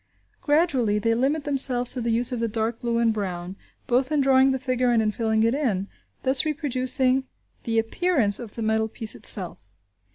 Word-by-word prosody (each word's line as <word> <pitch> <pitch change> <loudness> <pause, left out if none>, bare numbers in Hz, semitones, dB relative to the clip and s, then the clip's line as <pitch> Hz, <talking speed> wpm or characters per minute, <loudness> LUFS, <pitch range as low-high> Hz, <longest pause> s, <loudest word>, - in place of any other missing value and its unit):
Gradually 285 -9 +1
they 230 +2 0
limit 275 +6 -1
themselves 260 -4 +2
to 250 - -4
the 235 - -2
use 235 +3 0
of 245 - -3
the 230 - -1
dark 225 +1 -3
blue 235 -1 -2
and 230 -1 +2
brown, 185 -3 -5 0.3
both 260 +2 0
in 300 - +1
drawing 265 -1 +4
the 265 - 0
figure 255 -1 -1
and 235 -1 +2
in 215 -1 0
filling 220 0 0
it 230 +1 +2
in, 215 -9 -2 0.3
thus 260 0 +3
reproducing 265 -3 0 0.4
the 225 -1 -1
appearance 225 - +1
of 230 -4 -10
the 230 - -5
metal 220 0 0
piece 220 0 -2
itself. 175 - +2
240 Hz, 190 wpm, -24 LUFS, 220-265 Hz, 0.4 s, drawing